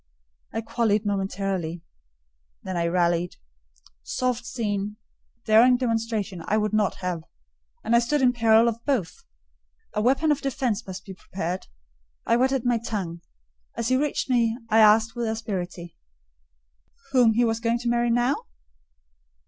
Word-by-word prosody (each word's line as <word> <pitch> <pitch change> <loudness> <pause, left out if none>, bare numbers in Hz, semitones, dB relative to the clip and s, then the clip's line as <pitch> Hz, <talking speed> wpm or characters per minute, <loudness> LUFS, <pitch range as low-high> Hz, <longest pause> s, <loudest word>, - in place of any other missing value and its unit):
I 225 - -3
quailed 225 -2 0
momentarily—then 170 - -5
I 170 -1 0
rallied. 175 0 +1 0.7
Soft 245 - -2
scene, 205 -3 -3 0.5
daring 240 +3 +6
demonstration, 225 -6 -2
I 215 - +2
would 215 -1 0
not 215 -2 +1
have; 175 -3 -2 0.6
and 235 - +2
I - - +7
stood 265 +5 0
in 250 -2 +4
peril 225 -1 +4
of 230 0 -2
both: 235 - -2 0.7
a 210 - 0
weapon 270 +7 +2
of 295 - 0
defence 250 -6 -2
must 190 0 -7
be 195 - -8
prepared—I 65 - -5
whetted 260 +1 +1
my 240 -1 +2
tongue: 190 -7 -4 0.5
as 230 0 -2
he 255 - +3
reached 290 +2 0
me, 235 -3 +2
I 220 - +5
asked 220 +1 +5
with 240 -1 -2
asperity, 185 -6 -4 1.2
"whom 245 -4 +5
he 240 +2 +3
was 225 -1 0
going 230 0 +1
to 240 0 -5
marry 240 0 +1
now?" 240 +4 +1
220 Hz, 140 wpm, -25 LUFS, 185-240 Hz, 1.2 s, I